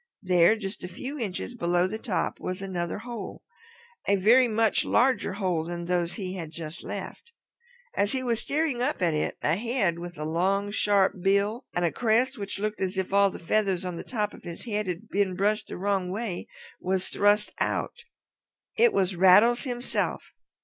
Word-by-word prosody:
There, 180 +2 +5
just 205 -1 -6
a - - -3
few 260 +11 -6
inches 215 +2 -4
below 175 -5 +1
the 215 +4 -3
top, 220 -6 -2
was 185 0 -4
another 175 -3 -3
hole, 230 -2 -7 0.6
a 200 - +4
very 235 +7 +5
much 225 -1 +2
larger 255 -5 +2
hole 185 -5 0
than 170 0 -5
those 175 -1 0
he 185 -3 -4
had 170 -4 -5
just 160 0 -8
left. - - -6 0.7
As 205 +1 +1
he 260 -1 -1
was 235 -3 0
staring 290 -4 -1
up 255 -6 0
at 170 -2 +2
it 150 - -1
a - - +3
head 215 -7 0
with 175 -1 -8
a 150 - -4
long 195 +5 0
sharp 200 -3 +2
bill 200 +6 +1
and 175 - +1
a 165 - +1
crest 245 +3 +2
which 200 -1 -4
looked 210 +1 -3
as 190 0 -1
if 190 0 -2
all 200 0 +5
the - - -8
feathers 190 0 0
on 180 -1 -3
the - - -6
top 210 -4 -2
of - - -12
his 170 +5 -8
head 210 -3 -1
had 180 -1 -4
been 195 -2 0
brushed 205 +3 0
the - - -6
wrong 195 -1 0
way, 200 -1 -3 0.3
was 185 0 0
thrust 205 +1 +2
out. 475 - -2 0.7
It 470 0 +5
was 190 -1 +1
Rattles 205 +8 +6
himself. 245 -1 -2
200 Hz, 190 wpm, -27 LUFS, 180-225 Hz, 0.7 s, Rattles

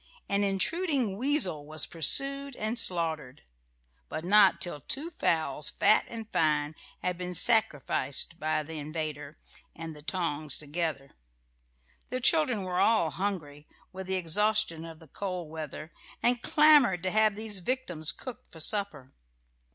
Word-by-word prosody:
An 200 0 0
intruding 250 - 0
weasel 230 - +1
was 155 +1 -1
pursued 275 - +1
and 220 +2 -2
slaughtered; 160 - 0 0.7
but 160 - -5
not 205 +3 +5
till 160 -5 -3
two 295 - -5
fowls, 155 - 0
fat 215 - +3
and 225 -2 -8
fine, 150 -1 +1 0.3
had 180 -1 -2
been 180 0 -4
sacrificed 165 - +3
by 155 -1 -1
the 160 +1 -8
invader 150 -1 -6 0.4
and 165 -1 -8
the 150 - -12
tongs 155 -3 -2
together. 150 -2 -4 1.0
The 255 - -3
children 255 - +2
were 180 -1 -2
all 215 -8 +3
hungry, 160 -6 -5 0.3
with 190 0 -7
the 190 - -1
exhaustion 185 -1 0
of 165 -1 -10
the 160 0 -17
cold 180 -5 -5
weather, 155 0 -8 0.3
and 240 0 +2
clamoured 290 - +5
to 185 - -1
have 215 0 +3
these 215 -2 -3
victims 180 - 0
cooked 255 -5 -10
for 165 - -13
supper. 160 - -2
180 Hz, 140 wpm, -28 LUFS, 155-220 Hz, 1.0 s, not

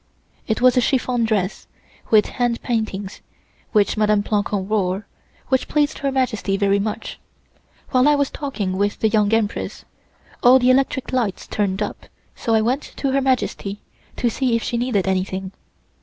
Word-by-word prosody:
'" - - -37
It 220 - 0
was 255 0 +5
a 250 - +4
chiffon 245 -2 +1
dress, 205 -4 -1 0.4
with 215 -2 +5
hand 240 -2 -2
paintings, 215 -5 -3 0.5
which 210 0 +2
Mdme. 210 -1 +3
Plancon 205 -2 -1
wore, 200 -1 0 0.4
which 260 -1 +1
pleased 300 0 0
Her 275 -2 -1
Majesty 245 -7 0
very 200 0 +2
much. 215 +2 -4 0.7
While 255 +1 +4
I 295 - +5
was 285 -1 0
talking 210 -10 -3
with 205 +1 0
the 220 - +2
Young 210 -1 +2
Empress 225 -2 -1 0.6
all 250 +2 +7
the 255 0 +4
electric 265 0 0
lights 230 -7 -1
turned 200 -1 -1
up, 205 - -7 0.3
so 225 - 0
I 220 - +4
went 250 +6 +1
to 275 - -1
Her 275 +1 +2
Majesty 240 -6 -1 0.3
to 245 - 0
see 245 0 +1
if 230 - -1
she - - -2
needed 235 -6 0
anything. 190 0 -1
220 Hz, 170 wpm, -21 LUFS, 205-255 Hz, 0.7 s, all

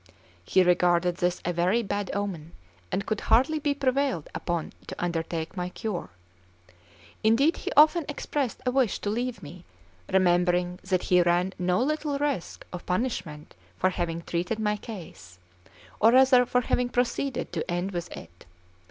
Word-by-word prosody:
He 185 - +4
regarded 175 0 +3
this 180 0 0
as 175 - +1
a - - -5
very 185 +7 +2
bad 205 -1 -3
omen, 180 -6 -4 0.4
and 200 - -1
could 215 -1 -2
hardly 260 +8 +3
be 290 -1 0
prevailed 270 - 0
upon 170 -2 -3
to - - -6
undertake 165 -1 -3
my 180 -1 -3
cure. 195 - -4 1.1
Indeed, 260 +9 +4
he - - -4
often 310 +2 +6
expressed 285 -3 -3
a 250 - +2
wish 255 -4 +2
to 205 - -3
leave 240 -1 -3
me, 170 +4 -10 0.5
remembering 180 -1 +2
that 185 -2 0
he 180 -1 +4
ran 175 +2 +2
no 180 +1 +1
little 300 0 -1
risk 280 -10 -3
of 180 - -6
punishment 180 -7 -3 0.2
for 185 - +2
having 170 -2 -3
treated 175 +7 -2
my 210 -1 0
case, 170 - -10 0.6
or 225 - +6
rather 255 -1 +6
for 250 - +2
having 245 0 0
proceeded 250 +1 -1
to - - -2
the - - -4
end 175 +3 -1
with 175 -1 -5
it. 85 +1 -13
190 Hz, 160 wpm, -27 LUFS, 175-250 Hz, 1.1 s, often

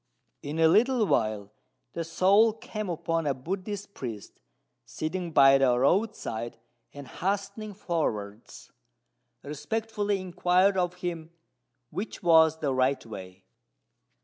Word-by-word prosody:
In 145 +2 -5
a 165 0 +5
little 230 +6 +3
while 110 - -1 0.4
the 170 - -3
soul 195 +7 +4
came 215 -2 -6
upon 165 -1 -1
a 140 - +1
Buddhist 195 - -5
priest 115 - -8 0.4
sitting 170 +2 -4
by 135 -2 +6
the 125 -2 +3
roadside, 130 - 0 0.3
and, 140 -2 -10
hastening 200 +2 -3
forwards, 115 - -4 0.7
respectfully 205 +7 -2
inquired 185 +1 +2
of 180 -1 0
him 165 -2 -4 0.6
which 200 -1 -6
was 160 -2 +5
the 145 -4 -1
right 130 +1 +1
way. 95 -4 -10
165 Hz, 115 wpm, -27 LUFS, 135-200 Hz, 0.7 s, by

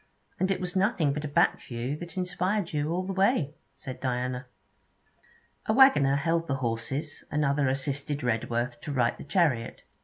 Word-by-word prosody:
'And 190 - +1
it 195 - +1
was 180 0 -4
nothing 185 - +2
but 150 +1 -4
a - - -2
back 145 - +2
view 120 +3 -4
that 175 +3 -9
inspired 180 +1 -1
you 150 +1 0
all 180 +2 0
the 195 - -3
way,' 190 - +2 0.2
said 130 -3 -8
Diana. 125 0 -2 1.2
A 215 - +3
waggoner 230 - +6
held 165 +3 0
the 135 - 0
horses, 135 +4 -3
another 145 -1 +1
assisted 140 +1 -2
Redworth 120 +1 -1
to 150 - -5
right 120 -4 +2
the - - -10
chariot. 145 -8 0
145 Hz, 165 wpm, -28 LUFS, 130-180 Hz, 1.2 s, waggoner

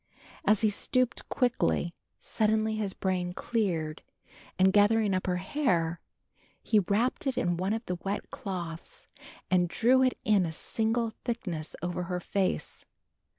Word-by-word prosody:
As 210 +1 +4
he 215 -2 +3
stooped 255 +4 0
quickly, 245 -8 +1 0.3
suddenly 220 0 +1
his 210 -3 -1
brain 180 -2 -2
cleared, 170 -9 -1 0.6
and, 190 +1 +4
gathering 210 0 +4
up 185 0 -1
her 180 - +1
hair, 180 - 0 0.6
he 215 - +4
wrapped 215 +9 0
it 265 - -1
in 175 -1 +1
one 185 +3 -1
of 225 +1 -3
the 180 -1 -3
wet 200 +1 -3
cloths 170 -4 -6 0.5
and 180 -2 +3
drew 250 +8 +4
it 255 -1 +2
in 205 -3 +4
a - - -4
single 225 +6 0
thickness 185 -10 -4
over 175 0 -2
her 180 0 -2
face. 190 +1 -2
200 Hz, 145 wpm, -29 LUFS, 180-225 Hz, 0.6 s, As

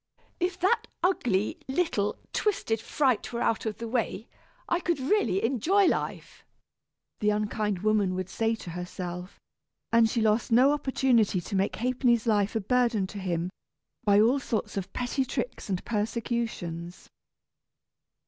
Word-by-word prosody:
"If 360 0 -1
that 385 +6 +2 0.2
ugly, 230 - +1
little, 265 - 0 0.2
twisted 225 - 0
fright 255 -1 0
were 235 - -3
out 225 - 0
of 215 - -3
the 230 - -5
way, 230 -2 -2 0.4
I 345 - +1
could 345 -4 -1
really 260 - +1
enjoy 320 - +3
life," - - -2 0.8
the 210 - +2
unkind 210 -2 -1
woman 210 -4 +2
would 185 -1 -3
say 225 +4 0
to 180 -6 -8
herself; 180 +1 -6 0.5
and 230 -1 +5
she 235 - 0
lost 220 +2 +2
no 260 +5 +6
opportunity 255 -8 +2
to 195 +4 -5
make 195 +1 +1
Ha'penny's 245 -1 +1
life 210 -2 +2
a 225 - +1
burden 235 -2 +2
to 200 +2 -7
him, 180 -1 -2 0.5
by 205 -1 +5
all 240 +6 +4
sorts 230 -4 -3
of 195 -1 -4
petty 250 +2 -1
tricks 260 - -4
and 185 -2 -2
persecutions. 210 -6 -3
225 Hz, 145 wpm, -28 LUFS, 200-255 Hz, 0.8 s, no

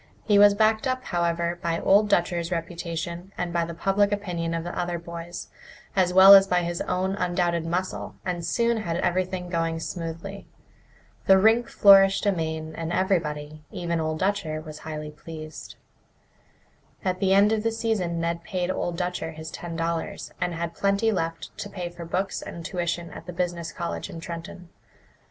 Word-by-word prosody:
He 205 -2 +5
was 205 0 +7
backed 220 +3 +2
up, 255 0 -1
however, 170 -2 -1
by 170 -3 -1
Old 205 +2 +4
Dutcher's 170 -1 +1
reputation 170 +1 -4
and 175 -1 -2
by 170 -1 +1
the 170 0 -7
public 200 +3 +2
opinion 175 -5 -2
of 165 - -2
the 175 - -5
other 175 -1 -1
boys, 170 +1 -7 0.5
as 185 -2 +3
well 190 +2 +10
as 195 0 +8
by 180 -1 +2
his 170 0 -3
own 185 +1 -1
undoubted 175 -3 0
muscle, 180 +3 -3
and 175 -2 -2
soon 235 +6 +1
had 170 -6 -2
everything 180 0 -1
going 165 -2 -1
smoothly. 170 +4 -6 0.8
The 190 - +8
rink 225 +4 +4
flourished 195 0 +6
amain, 160 -4 -1
and 165 +1 -4
everybody, 155 -5 -1
even 170 -2 -2
Old 155 0 -1
Dutcher, 185 -4 -1
was 155 -1 -9
highly 155 -1 -6
pleased. 155 0 -9 1.3
At 185 -1 0
the 195 0 +3
end 205 +2 +5
of 220 -1 +1
the 225 +1 0
season 220 -7 -1
Ned 170 0 -2
paid 180 0 -2
Old 175 -2 -2
Dutcher 180 -2 -3
his 160 0 -8
ten 170 -1 -6
dollars, 165 0 -3
and 175 -1 -1
had 170 0 -3
plenty 200 +4 +1
left 165 -4 -3
to 205 - -5
pay 180 -3 -5
for 175 -1 -9
books 190 +4 -2
and 170 -1 -8
tuition 175 -1 -2
at - - -10
the 180 - -6
business 170 -2 -2
college 170 - -4
in 165 - -7
Trenton. 170 +1 -8
175 Hz, 175 wpm, -25 LUFS, 165-195 Hz, 1.3 s, well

